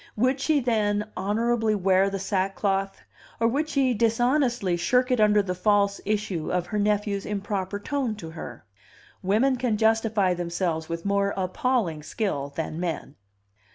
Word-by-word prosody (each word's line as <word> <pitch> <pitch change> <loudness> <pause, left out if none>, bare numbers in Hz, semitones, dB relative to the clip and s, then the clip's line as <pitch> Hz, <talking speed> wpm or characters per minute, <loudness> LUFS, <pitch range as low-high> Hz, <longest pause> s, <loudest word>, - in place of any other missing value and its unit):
Would 255 +5 +1
she, 300 +1 +2
then, 210 -4 0
honorably 220 +3 +1
wear 195 0 +3
the 195 - -3
sackcloth, 195 0 -1 0.4
or 230 - +3
would 290 +6 0
she 270 -4 +2
dishonestly 240 -2 +1
shirk 250 +9 +1
it 250 - +2
under 210 -1 +4
the 180 -2 -2
false 200 +2 +2
issue 205 -6 -2
of 180 -1 0
her 210 +3 -2
nephew's 205 -1 0
improper 200 -1 -3
tone 260 -1 -2
to 165 -6 -8
her? 140 -7 -9 0.6
Women 225 +8 +2
can 240 -3 0
justify 220 -3 +2
themselves 170 -2 -2
with 165 +1 -4
more 200 0 +1
appalling 185 -3 0
skill 145 -5 -3
than 160 0 -3
men. 165 -5 -3
205 Hz, 150 wpm, -25 LUFS, 185-230 Hz, 0.6 s, under